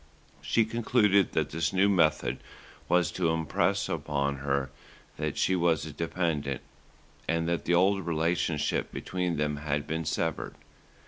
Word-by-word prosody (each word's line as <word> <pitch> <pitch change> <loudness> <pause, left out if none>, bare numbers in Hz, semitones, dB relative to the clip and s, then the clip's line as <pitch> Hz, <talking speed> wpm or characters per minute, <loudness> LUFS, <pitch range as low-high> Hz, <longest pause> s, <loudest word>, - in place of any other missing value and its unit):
She 115 - +2
concluded 110 -4 +2
that - - 0
this 80 +2 0
new 95 +1 +3
method 80 -9 +2 0.5
was 90 -1 +3
to 90 -3 0
impress 80 -1 0
upon 70 -1 -1
her 70 0 -1 0.5
that - - -3
she 95 - +2
was 85 -4 +2
a 80 - -6
dependent, 75 -3 -2 0.7
and 80 0 0
that 85 0 -1
the 85 - +3
old 95 +1 +2
relationship 80 -1 0
between 90 -3 -2
them 75 0 0
had 75 -1 -2
been 80 +1 -3
severed. - - -2
80 Hz, 140 wpm, -28 LUFS, 75-90 Hz, 0.7 s, new